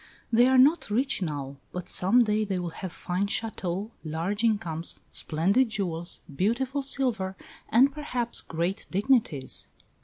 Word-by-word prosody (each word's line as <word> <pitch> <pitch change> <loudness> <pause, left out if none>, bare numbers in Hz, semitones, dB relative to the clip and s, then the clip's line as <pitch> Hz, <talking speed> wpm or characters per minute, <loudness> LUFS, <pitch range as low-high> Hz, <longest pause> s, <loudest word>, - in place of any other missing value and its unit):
"They 240 +2 +6
are 260 0 +4
not 285 +4 +5
rich 250 +2 0
now; 140 -5 -4
but 180 -1 -5
some 215 +9 +4
day 215 -1 +1
they 195 -3 -2
will 175 -2 -3
have 185 +2 -6
fine 180 +3 -2
châteaux, 200 -2 -2
large 170 +7 -2
incomes, 175 -8 -1
splendid 195 +11 +1
jewels, 175 -6 -2
beautiful 250 - 0
silver, 240 -9 -1 0.3
and 260 +5 +5
perhaps 250 -5 -2
great 170 +4 -2
dignities." 200 - +1
200 Hz, 135 wpm, -27 LUFS, 175-245 Hz, 0.3 s, They